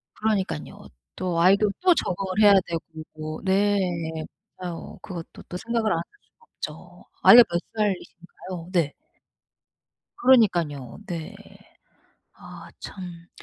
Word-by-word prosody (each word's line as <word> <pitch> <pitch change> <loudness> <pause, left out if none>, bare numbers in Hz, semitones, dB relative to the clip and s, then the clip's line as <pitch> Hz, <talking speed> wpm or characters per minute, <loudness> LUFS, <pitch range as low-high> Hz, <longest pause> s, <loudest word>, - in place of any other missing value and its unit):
그러니깐요. 215 -3 -2 0.3
또 180 -2 -1
아이도 200 +3 +5
또 365 -2 +5
적응을 190 - -1
해야 205 -1 +8
되고 155 -1 -6
네. 200 +2 +3 0.8
맞아요. 175 -2 -7
그것도 170 -3 -8
또 180 - -6
생각을 225 0 0
안 165 - +1
할 170 - -4 0.3
수가 465 - -28 0.3
없죠. - - -16 0.2
아이가 245 0 +10
몇 170 0 0 0.2
살이신가요? 185 -3 -4
네. 165 -5 +1 1.2
그러니깐요. 175 - +3
네. 170 -4 -5 1.1
아 - - -11
참. 175 -3 -9
185 Hz, 230 characters per minute, -25 LUFS, 170-205 Hz, 1.2 s, 아이가